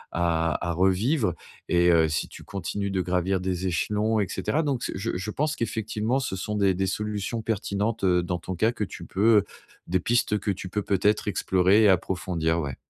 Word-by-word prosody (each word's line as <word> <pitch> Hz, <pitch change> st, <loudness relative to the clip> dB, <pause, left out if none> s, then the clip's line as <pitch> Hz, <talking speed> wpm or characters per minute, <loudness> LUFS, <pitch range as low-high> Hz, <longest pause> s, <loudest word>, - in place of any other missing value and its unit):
à 85 Hz, 0 st, 0 dB
à -, -, +1 dB
revivre 95 Hz, -, +2 dB, 0.4 s
et 85 Hz, 0 st, +4 dB
heu, 80 Hz, -1 st, +4 dB
si 75 Hz, -, -1 dB
tu -, -, -12 dB
continues 100 Hz, +1 st, -4 dB
de 95 Hz, -1 st, 0 dB
gravir 90 Hz, +1 st, 0 dB
des 90 Hz, 0 st, -2 dB
échelons 105 Hz, +5 st, 0 dB
et 100 Hz, -, +1 dB
cetera 140 Hz, -, -1 dB
donc 135 Hz, -5 st, -1 dB
c -, -, -3 dB
je 100 Hz, +2 st, -2 dB
je 95 Hz, +4 st, -4 dB
pense 150 Hz, +6 st, -1 dB
qu'effectivement 110 Hz, +2 st, -1 dB
ce 130 Hz, -8 st, -3 dB
sont 105 Hz, +3 st, -4 dB
des 100 Hz, -2 st, +3 dB
des 95 Hz, +1 st, 0 dB
solutions 105 Hz, +3 st, -3 dB
pertinentes, 105 Hz, 0 st, -2 dB
heu, 90 Hz, -2 st, +3 dB
dans 90 Hz, 0 st, -2 dB
ton 95 Hz, +2 st, -5 dB
cas 110 Hz, +6 st, +2 dB
que 120 Hz, -, -3 dB
tu 95 Hz, -3 st, -7 dB
peux, 105 Hz, +5 st, +3 dB
heu, 100 Hz, -, -3 dB, 0.4 s
des 95 Hz, +2 st, +1 dB
pistes 115 Hz, +1 st, +1 dB
que -, -, -3 dB
tu 95 Hz, -1 st, -5 dB
peux 105 Hz, +3 st, -1 dB
peut-être 105 Hz, +2 st, +1 dB
explorer 95 Hz, +1 st, +3 dB
et 105 Hz, -, +6 dB
approfondir, 85 Hz, -3 st, 0 dB
ouais. 70 Hz, -5 st, -3 dB
95 Hz, 205 wpm, -26 LUFS, 90-110 Hz, 0.4 s, et